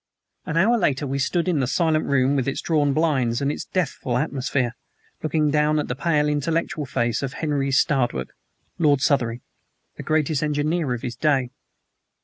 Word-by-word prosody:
An 160 - -2
hour 230 +7 +4
later 145 -6 +1
we 135 0 -2
stood 170 +6 0
in 170 -5 +1
the 130 - 0
silent 155 +3 +1
room, 135 0 +2
with 135 -2 0
its 140 - -1
drawn 150 -3 +1
blinds 135 -6 +1
and 140 0 0
its - - -5
deathful 140 -8 -2
atmosphere, 130 -3 -1 0.5
looking 155 -1 +1
down 150 +1 +2
at 150 - -2
the 125 - -2
pale, 150 0 +1
intellectual 150 0 -1
face 120 -4 -1
of 135 0 -3
Henry 145 -3 -1
Stradwick, 125 - +1 0.5
Lord 145 -4 +3
Southery, 125 -6 +1 0.6
the - - -6
greatest 155 -2 +1
engineer 150 0 0
of 120 - -9
his 120 -1 -4
day. 135 -3 +1
145 Hz, 170 wpm, -23 LUFS, 130-155 Hz, 0.6 s, hour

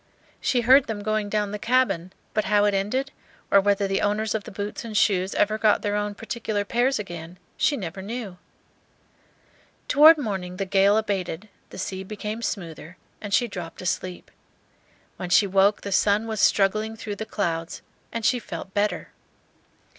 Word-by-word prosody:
She 250 -3 +1
heard 260 +4 +6
them 210 -2 -4
going 215 0 -1
down 210 -1 -1
the 210 - -4
cabin; 200 -8 +1 0.2
but 215 - 0
how 205 +1 +3
it 205 - +2
ended, 255 +8 -1 0.4
or 200 - +7
whether 200 0 +2
the 195 0 0
owners 210 +1 0
of 220 -2 -3
the - - -8
boots 205 +3 -5
and 220 -2 -3
shoes 190 -3 +2
ever 215 +1 +1
got 215 -1 +3
their 205 0 0
own 205 0 -2
particular 220 -2 -3
pairs 245 +5 +1
again, 175 -3 -7 0.2
she 290 - +1
never 190 -1 -6
knew. 205 -3 -6 1.5
Toward 310 +3 +8
morning 190 -9 -4
the 195 - -2
gale 195 +2 +4
abated, 200 -2 -2 0.2
the - - -11
sea 190 0 -4
became 210 +3 -5
smoother, 170 -6 -5 0.2
and 205 - -6
she 240 +4 +3
dropped 175 -6 -7
asleep. 180 0 -4 0.9
When 180 - -5
she 200 - +5
woke 195 +1 +3
the 200 - -6
sun 205 +3 +3
was 220 -2 -2
struggling 215 +3 +2
through 215 -2 -6
the 220 - -4
clouds, 165 -4 -3 0.3
and 230 -1 -3
she 250 - +3
felt 195 -3 -8
better. 205 +1 -1
205 Hz, 170 wpm, -24 LUFS, 195-220 Hz, 1.5 s, Toward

